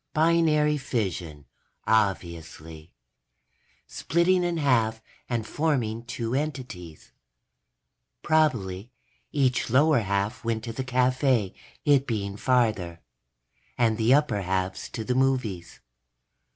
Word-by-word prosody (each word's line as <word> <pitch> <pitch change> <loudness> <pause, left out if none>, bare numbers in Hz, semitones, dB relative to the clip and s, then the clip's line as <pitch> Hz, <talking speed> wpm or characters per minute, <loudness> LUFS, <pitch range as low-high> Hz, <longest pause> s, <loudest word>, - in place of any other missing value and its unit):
_ - - -56
Binary 155 -2 +3
fission, 90 - -3 0.4
obviously. 85 -6 -2 0.9
Splitting 175 +3 +1
in 175 -1 -1
half 115 -7 +2 0.3
and 115 -3 -1
forming 120 -7 -1
two 120 -1 -4
entities. 125 - -5 1.1
Probably 120 -11 +1 0.4
each 130 -5 +1
lower 145 +3 +4
half 100 0 -2
went 115 -1 -2
to 115 -1 -5
the 130 - -3
cafe, 130 -4 +1 0.3
it 140 -2 +4
being 100 -4 -3
farther, 105 -8 0 0.8
and 115 -2 +2
the 115 +2 +3
upper 135 -7 +3
halves 95 0 -2
to 115 - -5
the 125 - -1
movies. 125 -9 -1
115 Hz, 105 wpm, -26 LUFS, 100-140 Hz, 1.1 s, lower